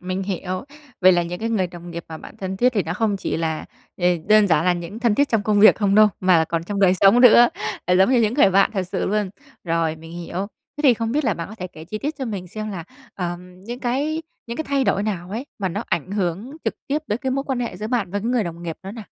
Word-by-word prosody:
mình 185 +1 -3
hiểu. 185 +2 -4 0.4
Vậy 185 0 +7
là 175 - +2
những 175 +1 -5
cái 230 - -1
người 195 -5 +1
đồng 175 0 -10
nghiệp 170 0 -6
mà 160 - -6
bạn - - -12
thân 190 -1 -4
thiết 250 +4 +3
thì 205 -5 +1
nó 160 +2 -3
không 215 0 0
chỉ 190 - -3
là, 160 -1 -2 0.3
ờ, 175 - 0 0.2
đơn 215 -1 +6
giản 165 -2 +2
là 180 - +4
những 175 +5 -6
thân 235 -3 +2
thiết 285 +3 +2
trong 225 -3 +1
công 205 0 +2
việc 215 - +8
không 200 -2 +1
đâu, 215 0 +7
mà 180 -3 +4
còn 165 0 -3
trong 200 +2 -3
đời 185 -2 +5
sống 200 +6 +5
nữa, 240 -1 +8 0.4
ờ, 180 0 +3
giống 190 +6 +4
như 250 -3 +4
những 220 +2 +1
người 235 -9 +5
bạn 195 +1 +4
thật 195 -3 -1
sự 185 +1 -3
luôn. 205 -1 0 0.3
Rồi, 165 -2 0
mình 165 +1 -12
hiểu. 175 +3 -4 0.3
Thế 295 - -5
thì 260 -4 +6
không 230 +1 -2
biết 300 +1 0
là 220 -7 +1
bạn 170 +1 -6
có 215 - -9
thể 185 -4 -6
kể 160 -3 -12
chi 215 +5 -5
tiết 295 +5 -3
cho 265 - -2
mình 200 -6 -5
xem 215 +4 -6
là, 175 -4 -6 0.3
ờm, 180 0 -6
những 240 +5 -7
cái 285 +6 -1 0.2
những 235 - -5
cái 315 - -3
thay 275 -2 0
đổi 195 - +1
nào 185 -4 -3
ấy 235 +7 -4
mà 190 -3 -1
nó 205 +6 -3
ảnh 170 +4 -2
hưởng 200 - -3
trực - - -1
tiếp 290 +2 0
tới 210 - 0
cái 265 - -2
mối 275 +1 -1
quan 265 -3 -2
hệ 235 - -3
giữa 215 - -5
bạn 220 -6 -1
và 205 - -1
cái 215 - -4
người 245 -3 +1
đồng 170 0 -7
nghiệp 165 -2 -5
đó 195 - -7
nào? 225 -2 -8
200 Hz, 290 wpm, -22 LUFS, 180-230 Hz, 0.4 s, việc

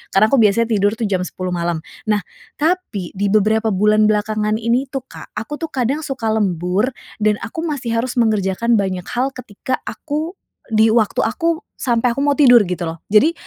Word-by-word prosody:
Karena 215 +3 +5
aku 275 - +4
biasanya 225 +2 +3
tidur 205 0 +2
jam 190 -4 0
10.00 185 0 -5
malam. 170 -2 -2 0.2
Nah, 210 -2 +1 0.3
tapi 300 - -1
di 200 +1 -1
beberapa 215 +2 +2
bulan 210 +1 +3
belakangan 215 +1 0
ini 235 +4 +1
tuh, 270 - -2
Kak, - - -12
aku 225 +8 -5
tuh 325 0 -6
kadang 270 +4 -1
suka 250 -5 -3
lembur 190 -1 +1 0.3
dan 215 -1 +2
aku 325 +8 -5
masih 245 -7 -2
harus 245 +2 -1
mengerjakan 220 0 +1
banyak 190 -3 -1
hal 260 +3 -1
ketika 250 0 -5
aku 315 +5 -4 0.3
di 220 0 +4
waktu 225 -3 +2
aku 330 +8 -1
sampai 240 -1 +1
aku 275 - -3
mau 285 -1 +2
tidur 245 -5 +7
gitu, 180 -2 -2
loh. 165 0 -6
Jadi 215 +11 +5
220 Hz, 180 wpm, -19 LUFS, 205-255 Hz, 0.3 s, tidur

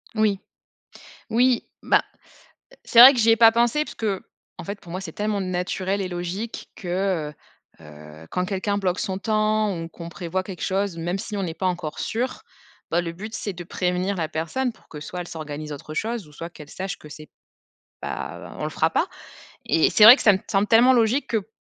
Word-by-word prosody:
Oui. 215 -3 +2 0.9
Oui, 240 +1 +2
bah, - - +3 0.8
c'est 235 - +6
vrai 260 +3 +12
que 250 - -3
j'y 225 0 +4
ai 225 - +6
pas 225 0 +7
pensé 240 +6 +2
parce - - -10
qu'en 200 -6 -6
fait, 200 +3 -6
pour 170 - -13
moi, 185 +2 -4
c'est 195 - -7
tellement 210 -1 -2
naturel 185 +1 -2
et 190 - -2
logique 180 +6 -5
que, 180 -4 -2 0.5
heu - - -15
heu, 75 +1 -13
quand 180 - -1
quelqu'un 200 +2 -1
bloque 185 -2 -1
son 190 -2 -2
temps 215 -2 +1
ou 165 - -6
qu'on 170 0 -9
prévoit 175 +2 -3
quelque 185 -3 -8
chose, 195 -2 -1
même 175 +3 -2
si 210 +1 -5
on 200 - -2
n'est 165 -3 -3
pas 185 - -2
encore 175 -4 -3
sûr, 245 +3 -3 0.5
bah, 170 - +2
le 165 -1 -4
but 215 +6 -8
c'est 205 - -3
de 175 -1 -8
prévenir 180 +3 -1
la 165 -3 -2
personne 170 +12 -2
pour - - -26
que, 150 - -9
soit 180 +4 -6
elle 175 - -6
s'organise 150 -1 -6
autre 145 +2 -8
chose, 225 +2 -3
ou 150 - -17
soit 165 +3 -7
qu'elle 150 -3 -13
sache 190 -3 -5
que 150 - -13
c'est 155 +1 -11 0.7
pas - - -6
on - - -3
le - - -2
fera - - +1
pas - - +1 0.6
et 160 - +3
c'est 210 - +4
vrai 225 +4 +12
que - - -6
ça 205 - +6
me 190 - +1
semble 200 0 +2
tellement 240 +4 +6
logique 235 +4 +2
que 220 -3 -1
190 Hz, 210 wpm, -24 LUFS, 170-215 Hz, 0.9 s, vrai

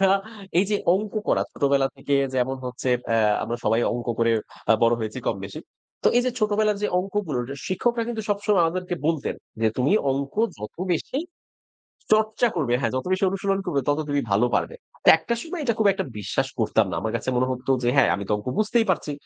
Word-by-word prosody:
আমরা - - +3 0.5
এই 195 - +5
যে 205 - +3 0.2
অঙ্ক 210 +1 -2 0.2
করা - - +3
ছোটবেলা 140 -1 +2
থেকে 140 +1 -1 0.2
যেমন 130 +1 0
হচ্ছে 125 +1 -4 0.2
অ্যা 115 - +2 0.2
আমরা 120 +1 -3
সবাই 110 +2 +3
অঙ্ক 120 -1 -4
করে 115 0 +3 0.4
আ - - +9
বড় 115 0 +5
হয়েছি 110 +2 -4
কম-বেশি। 100 -2 -3 0.4
তো - - +7
এই 245 - +5
যে 255 - +2
ছোটবেলার 210 0 +2
যে - - +3
অংকগুলোর 180 -10 -2
রা 140 - -5
শিক্ষকরা 230 +5 0
কিন্তু 225 -2 -3
সবসময় 205 -2 +2
আমাদেরকে 180 +2 -2
বলতেন 160 -4 0 0.3
যে, 110 - +3
"তুমি 130 +6 +2 0.2
অঙ্ক 140 +1 -3 0.2
যত 105 +1 -7 0.2
বেশি 250 - -2 0.9
চর্চা 220 +2 +3
করবে, 135 -7 +1
হ্যাঁ 115 -4 0
যত 130 - -2
বেশি 185 +1 +1
অনুশীলন 195 0 0
করবে 145 -6 +1
তত 145 +1 +2
তুমি 145 0 +1
ভালো 105 +5 +3
পারবে।" - - 0 0.3
তো - - +4
একটা 235 +8 -2
সময় 335 +1 -5
এটা 235 -4 +1
খুব 220 - +3
একটা 190 0 -3
বিশ্বাস 105 - -1
করতাম - - +2
না। - - -3
আমার 110 - -2
কাছে - - -7
মনে 125 +1 +2
হতো 130 +1 -3
যে, 120 - +1
"হ্যাঁ 135 - +5
আমি 100 - -3
তো - - +1
অঙ্ক 105 - -9
বুঝতেই 220 +2 +2
পারছি। 160 -4 -1
145 Hz, 205 wpm, -24 LUFS, -, 0.9 s, আ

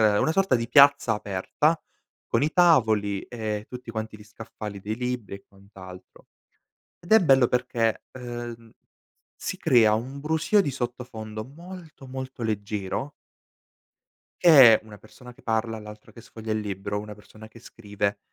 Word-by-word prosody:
è 105 -2 +4
una 160 - +1
sorta 195 -5 +2
di 115 -1 -4
piazza 140 -2 +5
aperta, 105 - -1 0.5
con 115 - 0
i 150 - +1
tavoli 110 - +3
e 110 -3 -5
tutti 125 -1 -8
quanti 110 -1 -5
gli 105 - -14
scaffali 105 -1 -9
dei 105 +3 -4
libri 125 -5 -4
e 100 - -19
quant'altro. 95 -2 -15 0.7
Ed 175 - -15
è 220 - +9
bello 135 -7 +4
perché, 120 -3 -1
ehm, 120 -2 -8 0.6
si - - -5
crea 110 -4 +4
un 130 +6 -5
brusio 160 +7 +2
di 145 - -1
sottofondo 120 -4 -6
molto, 165 +1 -12
molto 130 -1 -7
leggero 105 +4 -3 1.3
che 135 -10 +8
è - - -22
una 105 -2 -13
persona 125 +4 -15
che - - -22
parla, 110 0 -1
l'altra 105 0 -12
che 115 - -13
sfoglia 110 -1 -7
il 110 - 0
libro, 100 0 -4
una 105 0 -9
persona 110 +1 -15
che 115 - -16
scrive, 105 -3 -4
115 Hz, 155 wpm, -25 LUFS, 105-130 Hz, 1.3 s, è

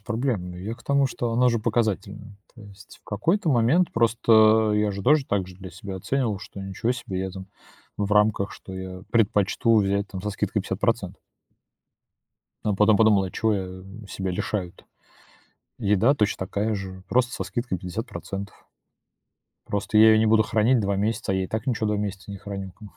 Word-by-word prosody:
проблем. 110 -4 -2
Ну, 90 - -9
я 105 +6 -5
к 125 - -19
тому, 140 -1 +2
что 120 -2 -3
она 125 +2 +4
же 115 -1 +1
показательная. 105 -2 -2 0.2
То 115 - -14
есть 100 -1 -15
в - - -48
какой-то 165 - 0
момент 140 +8 +3
просто 110 -1 +4
я 105 0 +1
же 100 0 -5
тоже 150 +1 +4
так 100 -3 -1
же 90 -1 -13
для 95 -1 -10
себя 95 -2 -7
оценивал, 115 0 -1
что 100 -1 -10
ничего 95 +5 -2
себе, 95 -6 -5
я 95 0 -3
там 95 0 -9 0.5
в 100 0 -2
рамках, 105 -1 +3
что 95 - -10
я 95 0 -7
предпочту 115 +1 +2
взять 100 0 +1
там 95 -2 -6
со 105 - -2
скидкой 100 - -2
50. - - -2 1.5
А 105 -2 +1
потом 105 +1 +4
подумал: 105 -3 +4
"А 90 - -5
чего 110 -1 0
я 95 -1 -5 0.2
себя 95 -1 -4
лишаю-то?" 90 0 -4 0.9
Еда 105 +7 +3
точь 105 -4 +1
такая 100 +4 -2
же, 95 -1 -7
просто 125 +2 +2
со 95 - -3
скидкой 105 0 -3
50. 95 +2 -7 1.0
Просто 105 +1 -1
я 110 0 +8
ее 110 - +5
не 110 - +3
буду 110 0 +4
хранить 115 +4 +2
2 100 -1 0
месяца, 100 -1 -1
я 95 0 0
и - - -5
так 110 +3 -4
ничего 110 -3 0
2 105 - 0
месяца 100 -1 -5
не 100 - -6
храню 100 -2 -7
как 105 +4 -13
бы. - - -20
105 Hz, 190 wpm, -25 LUFS, 95-115 Hz, 1.5 s, я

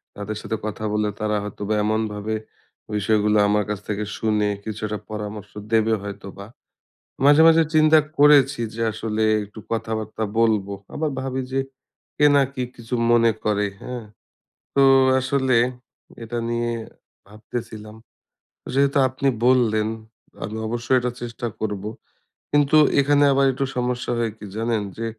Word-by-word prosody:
তাদের 105 +1 -5
সাথে 110 - -3
কথা 110 0 -5
বললে 105 0 +1
তারা 105 0 0
হয়তোবা 105 +1 -4
এমনভাবে 110 0 -1 0.6
বিষয়গুলো 105 +1 +2
আমার 105 0 +2
কাছ 105 -2 -2
থেকে 105 0 -2
শুনে 105 -2 +1
কিছু 110 -1 -6
একটা 105 0 -4
পরামর্শ 105 -1 -6 0.2
দেবে 110 0 +3
হয়তোবা। 100 -1 -8 0.8
মাঝে, 145 +2 +7
মাঝে 165 0 +6
চিন্তা 155 0 +6 0.2
করেছি 140 -3 +5
যে 115 - -5
আসলে 110 0 -2 0.2
একটু 105 +2 -12
কথাবার্তা 110 -1 -3 0.2
বলবো। 105 -3 +2 0.2
আবার 155 -1 -1
ভাবি 130 0 -3
যে, 135 - 0 0.6
কে 150 - +4
না 140 - +6
কি 130 -2 -3
কিছু 115 +1 -9 0.2
মনে 115 -1 +5
করে, 105 -1 +1
হ্যাঁ? 125 -3 -6 0.7
তো 140 - +4 0.4
আসলে 130 -1 +1 0.7
এটা 120 +1 -5
নিয়ে 120 0 -1 0.6
ভাবতেছিলাম। 110 0 -8 0.8
যেহেতু 140 +1 +2
আপনি 130 +2 -1 0.2
বললেন, 110 -4 +3 0.6
আমি 110 +1 -5
অবশ্যই 120 +3 0
এটা 125 0 -1
চেষ্টা 120 0 -5
করবো। 105 -1 -3 0.6
কিন্তু 145 +1 +4 0.2
এখানে 145 +1 +4
আবার 135 0 +3
একটু 135 +2 -1
সমস্যা 125 0 -2
হয় 115 -1 0
কি 105 - -10
জানেন? 115 -1 0 0.2
যে 115 - -3
110 Hz, 140 wpm, -22 LUFS, 105-130 Hz, 0.8 s, মাঝে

